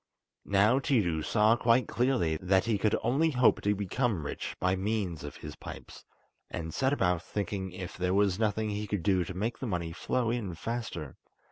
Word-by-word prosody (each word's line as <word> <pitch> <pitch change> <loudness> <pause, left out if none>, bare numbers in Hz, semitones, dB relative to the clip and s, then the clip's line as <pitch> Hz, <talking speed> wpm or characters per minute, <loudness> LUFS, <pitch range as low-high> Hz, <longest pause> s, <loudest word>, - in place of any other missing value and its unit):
Now 105 +6 +4
Tiidu 105 - +1
saw 110 +4 +4
quite 120 0 +3
clearly 120 -11 +1
that 95 +3 +2
he 110 -3 +1
could 105 +1 +2
only 140 +7 +2
hope 125 -5 +3
to 105 0 +1
become 100 - -1
rich - - -4
by 95 +1 +2
means 95 -5 -2
of 75 - -7
his - - -8
pipes, - - -10 0.4
and 80 -2 -5
set 130 0 +1
about 90 -10 +1
thinking 95 0 -3
if 90 0 -7
there 90 +1 0
was 100 -1 +2
nothing 110 0 0
he 105 +1 -3
could 100 -3 -2
do 95 -3 +3
to 90 +1 -7
make 110 +6 -2
the 130 - -3
money 85 -5 -2
flow 115 +7 -1
in 105 -8 -3
faster. 85 - -5
100 Hz, 190 wpm, -30 LUFS, 90-115 Hz, 0.4 s, Now